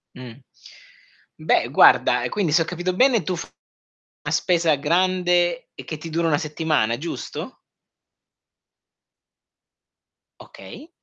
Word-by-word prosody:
Mh. 125 0 -12 1.0
Beh - - +1
guarda, 125 0 +4
e 125 - -1
quindi 185 -4 -2
se 165 +1 +4
ho - - -3
capito 180 +2 -4
bene 250 0 +3
tu 185 - -3
fai - - -8 0.8
una - - -2
spesa 170 -4 +1
grande, 175 +2 0
e - - -10
che 155 - -6
ti 165 +2 -9
dura 165 +1 -1
una 150 -3 +2
settimana, 150 -7 -1
giusto? 165 +5 -7 2.8
Okay. 315 - -13
165 Hz, 120 wpm, -22 LUFS, 150-180 Hz, 2.8 s, guarda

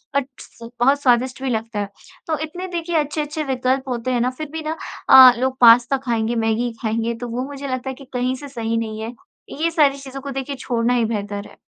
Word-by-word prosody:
But 280 -2 +1
स 230 0 -12
बहुत 275 +4 +3
स्वादिष्ट 255 0 +2
भी 265 - -1
लगता 225 -2 -2
है। 205 -1 -3 0.4
तो 315 -1 0
इतने 355 +4 -6
देखिए 345 -1 -3
अच्छे-अच्छे 300 0 -2
विकल्प 265 0 -1
होते 245 0 -2
हैं 245 -1 +1
ना, 250 - +2
फिर 285 +4 -7
भी 320 0 -5
ना 320 - -3 0.3
अ, 260 -1 +11
लोग 260 +1 -1
पास्ता 240 +3 +7
खाएँगे, 230 -1 0
मैगी 225 +1 0
खाएँगे, 225 +1 -1
तो 240 +1 -6
वो 245 +2 -3
मुझे 280 0 -7
लगता 255 0 -3
है - - -3
कि 275 - -13
कहीं 250 +1 0
से 285 +2 -9
सही 230 -3 -2
नहीं 220 -1 -4
है। 225 +2 -5 0.5
ये 335 +1 +2
सारी 290 -4 +3
चीज़ों 270 -1 -8
को 280 +1 -6
देखिए 270 +1 -4
छोड़ना 240 -1 0
ही 240 -2 +2
बेहतर 205 -2 -4
है। - - -17
255 Hz, 225 wpm, -21 LUFS, 230-280 Hz, 0.5 s, अ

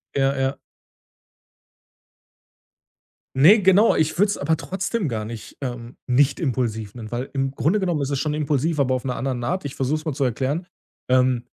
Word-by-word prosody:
Ja, 135 0 +2
ja. 135 0 0 2.8
Ne, 180 +11 +7
genau. 190 +4 +5
Ich 160 +1 0
würde 205 +4 +4
es 205 - -1
aber 160 0 0
trotzdem 190 +3 -2
gar 110 -5 -3
nicht, 115 0 -9
ähm 120 -2 -6
nicht 135 +2 +3
impulsiv 115 -7 -2
nennen, 110 -3 -8
weil 120 +2 -3
im 135 -1 -1
Grunde 160 +9 +1
genommen 175 -6 0
ist 140 - -2
es 140 -2 -1
schon 150 0 -1
impulsiv, 150 +1 0
aber 130 -2 +2
auf 130 0 -2
'ner 125 -2 -2
anderen 130 -2 -3
Art. 165 +10 -1
Ich 140 0 -6
versuche 135 +2 0
es 155 - -14
mal 155 - -1
zu 140 0 0
erklären. 135 - -1 0.4
Ähm, 125 -1 +2
135 Hz, 180 wpm, -23 LUFS, 125-155 Hz, 2.8 s, Ne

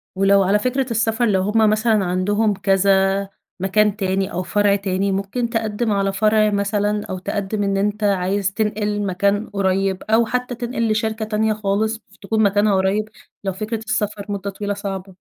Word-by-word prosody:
ولو 195 +1 +4
على 195 +3 +2
فكرة 255 +3 -1
السَفر، 225 +1 +1
لو 195 -4 +2
هُم 215 +2 +3
مثلًا 215 -1 +2
عندهم 205 +4 +1
كذا 195 0 +2 0.3
مكان 205 +2 +2
تاني 190 -1 -1
أو 180 - -2
فرع 205 +1 +2
تاني، 195 0 -1
ممكن 200 +5 -2
تقدّم 225 0 -1
على 195 -1 0
فرع 215 +1 +3
مثلًا 205 0 0
أو 185 - -5
تقدّم 205 +2 -3
إن 195 0 0
أنت 210 +2 -1
عايز 195 0 +1
تنقل 210 -1 -1
مكان 200 +3 0
قريّب 195 -1 0
أو 225 +2 +3
حتى 250 +2 -2
تنقل 235 -1 -2
لشركة 220 0 -1
تانية 215 0 0
خالص 215 +1 -1
ف 210 -2 -25
تكون 220 +2 0
مكانها 205 0 +3
قريّب، 195 +3 0 0.3
لو 195 -1 -2
فكرة 215 +4 -3
السفر 210 -2 -2
مدّة 200 0 -3
طويلة 205 +1 -3
صعبة. 195 -2 -6
205 Hz, 170 wpm, -20 LUFS, 195-215 Hz, 0.3 s, ولو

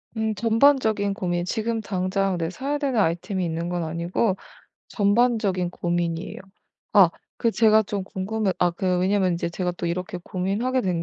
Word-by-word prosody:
음 220 0 0
전반적인 225 -3 +3
고민 175 -2 -2
지금 225 +3 -2
당장 190 -1 -1
네 165 -1 -2
사야 275 +9 -3
되는 270 -6 0
아이템이 180 +2 0
있는 165 +1 -3
건 175 -1 -2
아니고 170 +5 0 0.5
전반적인 205 -4 +1
고민이에요. 175 0 -2 0.5
아 195 -5 +7 0.3
그 230 - +3
제가 220 -1 +4
좀 200 -1 -3
궁금해 200 +1 -2
아 180 - +4
그 180 +1 0
왜냐면 185 0 +2
이제 170 0 -2
제가 180 +1 -2
또 175 - -2
이렇게 180 +1 -3
고민하게 205 +9 -1
된 180 -3 -1
190 Hz, 330 characters per minute, -24 LUFS, 175-220 Hz, 0.5 s, 아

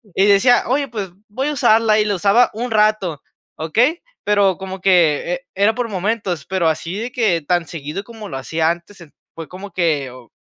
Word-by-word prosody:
y 195 - +4
decía: 205 +5 +5
"Oye, 275 +2 0
pues 205 -5 -5 0.2
voy 260 +7 -2
a - - -2
usarla" 220 -4 +3
y 210 - +2
la 205 - 0
usaba 205 +6 +4
un 240 +2 -4
rato, 210 -8 +1 0.3
¿okey? 230 - +1 0.2
Pero 200 -3 +2
como 190 -1 -7
que 175 -1 +2
era 205 +3 +3
por 240 -2 -2
momentos, 190 -5 -2
pero 185 -3 0
así 165 +3 -2
de 235 +3 -4
que 210 -10 +1
tan 175 +2 0
seguido 155 +5 -6
como 220 -2 -10
lo 135 - -5
hacía 160 +5 0
antes, 175 +3 -6
ent 160 -4 -15 0.2
fue 165 -1 -7
como 195 +2 -10
que, 155 -7 0
o 125 -1 -15
195 Hz, 195 wpm, -19 LUFS, 170-220 Hz, 0.3 s, decía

